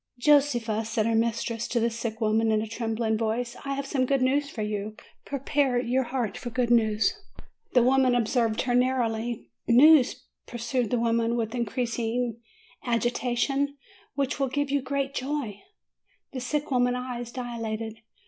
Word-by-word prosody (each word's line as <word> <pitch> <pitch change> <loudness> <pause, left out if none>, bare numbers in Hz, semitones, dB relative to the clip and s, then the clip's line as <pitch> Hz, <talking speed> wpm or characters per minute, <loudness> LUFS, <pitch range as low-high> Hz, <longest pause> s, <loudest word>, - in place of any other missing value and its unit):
"Josefa," 245 -6 +3
said 220 -1 -1
her 230 - +1
mistress 230 0 0
to 240 - 0
the 230 +1 +1
sick 230 -1 -4
woman, 220 0 +2
in 215 - +3
a 215 - -2
trembling 225 -1 -1
voice, 235 +2 -1
"I 275 0 -2
have 280 0 -3
some 265 -2 0
good 275 -1 +2
news 280 +2 +1
for 220 - -4
you. 210 0 -3 0.3
Prepare 280 -2 0
your 250 +1 0
heart 240 -3 -3
for 240 - -5
good 240 0 0
news," 220 -2 +3 0.6
The 245 - +5
woman 260 0 +4
observed 230 -1 +1
her 245 - 0
narrowly. 240 -2 0 0.2
"News/' 270 +2 +6 0.2
pursued 240 0 -2
the 245 - +1
lady, 230 0 +1
with 230 -1 -2
increasing 235 0 -2 0.4
agita 240 0 0
tion, 280 +2 0 0.4
"which 275 0 -1
will 270 -1 +1
give 285 +1 -1
you 285 -1 +2
great 275 +1 -2
joy." 260 -7 -3 0.7
The 260 - -3
sick 290 +4 -2
woman's 245 -1 +2
eyes 245 -2 -5
dilated. 225 -3 -5
240 Hz, 160 wpm, -27 LUFS, 225-260 Hz, 0.7 s, News